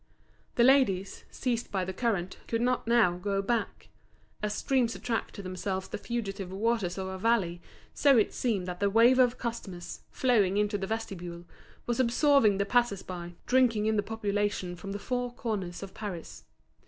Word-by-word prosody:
The 235 - +4
ladies, 235 -8 +3
seized 240 -2 -2
by 190 -2 -1
the 190 - -4
current, 190 -4 -1
could 230 - 0
not 250 0 0
now 225 -7 +4
go 195 +2 -1
back. 230 +3 -2 0.5
As 210 0 -1
streams 250 -3 +1
attract 230 -2 -3
to 200 - -7
themselves 190 +1 -3
the - - -5
fugitive 195 -6 -4
waters 200 -2 0
of 190 - -3
a 190 0 -5
valley, 185 -6 +1 0.3
so 280 -3 +5
it 215 - +2
seemed 215 -7 -1
that 180 0 -5
the 200 - +2
wave 235 +5 +5
of 250 -1 +4
customers, 210 -7 -6
flowing 210 -7 +2
into 210 0 +1
the 195 - -3
vestibule, 180 -6 -5 0.4
was 240 +1 -1
absorbing 250 -3 +4
the 200 - +1
passers 240 -3 +1
by, 175 -1 -7
drinking 245 -5 +3
in 220 0 +2
the 205 - +3
population 205 -4 -2
from 195 +3 -7
the 200 - -3
four 245 +3 -2
corners 200 -7 -4
of 195 - -9
Paris. 190 -6 -7
210 Hz, 175 wpm, -29 LUFS, 190-235 Hz, 0.5 s, so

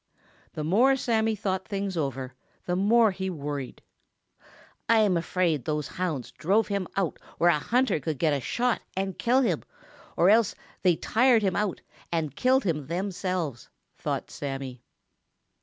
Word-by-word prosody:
The 155 - -4
more 235 - +4
Sammy 225 -4 +1
thought 190 -2 -2
things 200 -2 -3
over, 135 -4 -3 0.3
the 180 - 0
more 215 +3 +4
he 190 0 -3
worried. 145 -5 -5 1.1
"I 230 - +6
am 200 -4 +3
afraid 170 -4 0
those 150 -1 -2
hounds 160 -9 -3
drove 200 +7 +1
him 200 -3 -1
out 190 -4 -1 0.2
where 175 +1 +5
a 150 - +1
hunter 245 - +1
could 150 +1 -3
get 155 0 +2
a 140 - 0
shot 245 - 0 0.2
and 190 -1 -2
kill 250 +3 +3
him, 250 - +1 0.6
or 180 +4 +6
else 225 -2 +4
that - - -26
they 180 -3 +4
tired 235 +4 +3
him 190 -2 +1
out 205 -3 -1 0.3
and 155 -5 -1
killed 260 +1 +3
him 150 -7 -1
themselves," 180 - -3 0.3
thought - - -3
Sammy. 135 -3 -5
185 Hz, 155 wpm, -27 LUFS, 150-215 Hz, 1.1 s, I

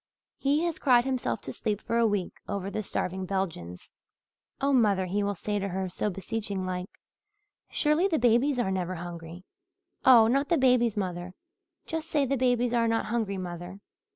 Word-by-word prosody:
He 290 +4 +2
has 340 -2 -2
cried 245 -3 +4
himself 260 -2 -1
to - - -6
sleep 210 -3 -2
for 230 +1 -1
a 230 - +4
week, 205 -4 -1 0.2
over 200 -1 -3
the 215 - -2
starving 190 -2 -3
Belgians. 165 - -4 0.7
'Oh, 275 +1 +1
mother,' 205 -7 +3
he 195 +3 -1
will 200 0 -1
say 205 +3 -2
to 200 - -2
her, 190 0 -3
so 210 - -2
beseeching 200 0 -4
like, 180 0 -4 0.8
'surely 305 +5 +2
the 330 -5 +1
babies 245 +4 +3
are 235 -6 0
never 185 -1 -2
hungry 170 0 -8 0.6
oh, 240 -4 +8
not 275 +5 +1
the 340 - +3
babies, 250 -4 +3
mother! 180 -2 -3 0.5
Just 320 0 -4
say 290 -3 +2
the 275 +1 0
babies 245 -2 +1
are 230 -1 +3
not 225 0 +1
hungry, 215 -4 -1
mother.' 175 +1 -6
210 Hz, 180 wpm, -28 LUFS, 185-250 Hz, 0.8 s, oh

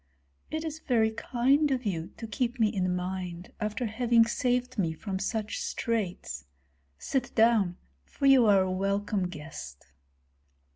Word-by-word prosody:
"It 315 +1 -3
is 315 0 -4
very 225 -6 +2
kind 260 +6 +2
of 260 -3 -1
you 170 -5 -2
to 230 - -6
keep 240 +2 -2
me 220 -2 +4
in 185 -4 0
mind 180 -1 -5
after 215 +3 -2
having 230 +1 +3
saved 250 0 0
me 165 -4 +1
from 190 +3 -4
such 210 +1 -2
straits. 185 - -2 0.5
Sit 255 - -2
down, 220 -6 +4 0.3
for 175 - -4
you 265 -4 +7
are 195 -2 +6
a 185 - -2
welcome 195 0 0
guest." 150 - -9
215 Hz, 145 wpm, -29 LUFS, 185-245 Hz, 0.5 s, you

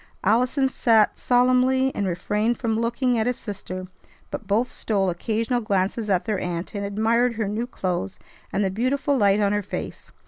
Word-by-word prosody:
Allison 250 +6 +2
sat 225 -4 +3
solemnly, 255 +1 +3
and 200 - -1
refrained 210 +6 0
from 225 -2 -1
looking 235 +1 +1
at 220 - 0
his 250 - 0
sister; 185 -3 -6 0.5
but 255 -8 -6
both 220 +5 +2
stole 195 -6 -1
occasional 225 +6 -1
glances 205 +1 -1
at 185 -3 +1
their 215 -4 -1
aunt, 175 +2 -4
and 200 -1 -3
admired 225 +4 +1
her 220 -2 -1
new 220 +4 -2
clothes 180 - -3 0.3
and 200 - 0
the 190 - 0
beautiful 270 +7 0
light 205 -4 +3
on 205 -1 +2
her 205 - +1
face. 200 - -7
220 Hz, 175 wpm, -24 LUFS, 200-245 Hz, 0.5 s, sat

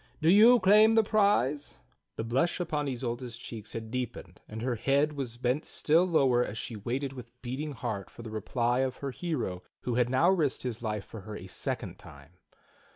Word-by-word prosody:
Do 160 +1 +4
you 230 +5 +8
claim 215 +3 +6
the 225 - +6
prize 200 - +1 0.4
The - - -3
blush 130 +11 0
upon 150 -4 -1
Isolda's 120 -1 -4
cheeks 110 -3 -8
had 110 -1 -6
deepened, 125 -2 -5
and 110 +1 -6
her 125 0 0
head 140 +6 +1
was 130 -5 -5
bent 125 +4 0
still 165 +4 +2
lower 130 -8 +3
as 110 - -5
she 115 - -5
waited 130 +6 -3
with 125 -1 -11
beating 140 +5 -4
heart 110 -6 -4
for 120 - -12
the 110 - -7
reply 120 +3 0
of 130 -1 0
her 140 -1 -5
hero 125 - -3 0.2
who 125 - -2
had 120 0 +2
now 130 +8 +4
risked 155 -8 0
his 120 -2 -4
life 105 -3 -3
for 110 - -9
her 105 +2 -8
a 90 - -8
second 95 - -5
time. 70 +1 -14
125 Hz, 195 wpm, -29 LUFS, 115-150 Hz, 0.4 s, you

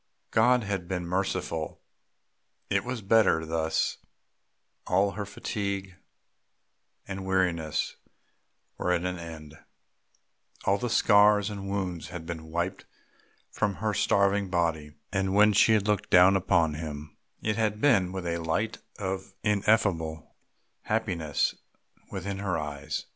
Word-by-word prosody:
God 125 -1 +4
had 95 -4 -3
been 90 -1 -3
merciful; 90 -3 -2 0.9
it - - +2
was 120 -3 -4
better 95 -6 +4
thus; 80 0 0 0.9
all 100 +1 +3
her 100 +1 -5
fatigue 100 -2 -4 1.1
and 95 -1 -5
weariness 90 -5 0 0.8
were 90 - 0
at 90 0 +1
an 90 -1 -2
end, 80 -2 -9 1.1
all 100 +1 +2
the 120 - -2
scars 105 -1 +5
and 100 -1 -6
wounds 90 -4 -3
had 90 -2 -7
been 80 -1 -6
wiped 85 +3 -3 0.7
from 100 -2 -1
her 110 0 -1
starving 100 0 +2
body, 80 -4 -1 0.2
and 95 -1 0
when 105 +1 +6
she 110 +3 +5
had 105 -1 +2
looked 105 -2 0
down 90 +2 +7
upon 85 -4 +2
him 75 -1 -7 0.3
it 110 0 0
had 105 -1 0
been 100 -10 +3
with 95 -1 -5
a 85 0 -1
light 85 +7 -1 0.2
of 95 -1 -4
ineffable 100 -7 +1 0.5
happiness 90 -9 0 0.6
within 95 +1 -4
her 100 -3 -1
eyes. 75 0 -4
95 Hz, 125 wpm, -28 LUFS, 85-100 Hz, 1.1 s, down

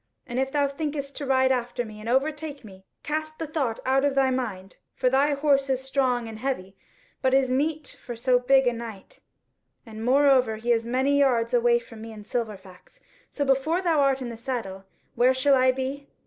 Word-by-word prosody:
And 245 +1 -3
if 265 0 -1
thou 285 -1 +2
thinkest 280 -1 -4
to 285 - -4
ride 260 0 +3
after 245 -1 -1
me, 215 -1 -10
and 220 +2 -6
overtake 290 +1 -1
me, 190 -2 -14 0.2
cast 310 +1 -3
the 325 - -4
thought 280 -7 -2
out 265 +1 +2
of 285 -1 +1
thy 265 -1 +3
mind. 200 -8 -4 0.2
For 255 -1 +1
thy 285 +2 +3
horse 275 -1 +2
is 265 0 0
strong 260 -3 0
but 225 -1 -8
heavy, 210 -7 -3 0.5
as 260 0 +2
is 265 -1 +2
meet 295 +3 -1
for 240 - -6
so 250 +2 +2
big 265 +1 +4
a 245 - +2
knight, 230 -4 -9 0.7
and 220 -1 -8
moreover 260 -2 +4
he 235 +2 -2
is 230 0 +1
many 265 +4 +2
yards 245 -4 +2
away 240 0 +4
from 230 -2 -11
me 225 0 -8
and 210 -1 -11
Silverfax: 210 - -6 0.3
so 285 - -2
before 275 +6 +1
thou 335 -5 +1
art 270 -1 +2
in 245 - -5
the 230 - -7
saddle, 220 -6 -5 0.3
where 255 +2 +3
shall 275 +2 +3
I 255 0 +4
be? 265 +2 -5
260 Hz, 205 wpm, -25 LUFS, 235-280 Hz, 0.7 s, big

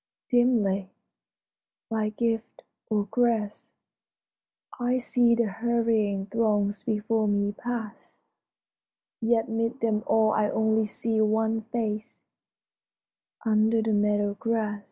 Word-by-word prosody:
Dimly, 215 -6 +2 1.0
by 220 -1 -1
gift 225 +1 -3 0.3
or 210 -2 +1
grace, 230 -4 0 1.1
I 245 +1 +1
see 240 -1 +3
the 235 0 +2
hurrying 220 -2 0
throngs 205 -1 0
before 220 0 0
me 205 0 +1
pass; 230 0 -7 1.0
Yet 225 0 +2
'mid 230 +2 -2
them 220 -2 +1
all 220 -1 +3
I 210 -1 +1
only 220 0 +1
see 220 +1 -1
one 220 +1 +1
face 220 -1 -4 1.2
Under 220 +1 +3
the 220 -1 0
meadow 205 0 +1
gra^. 215 0 -2
220 Hz, 105 wpm, -26 LUFS, 210-230 Hz, 1.2 s, see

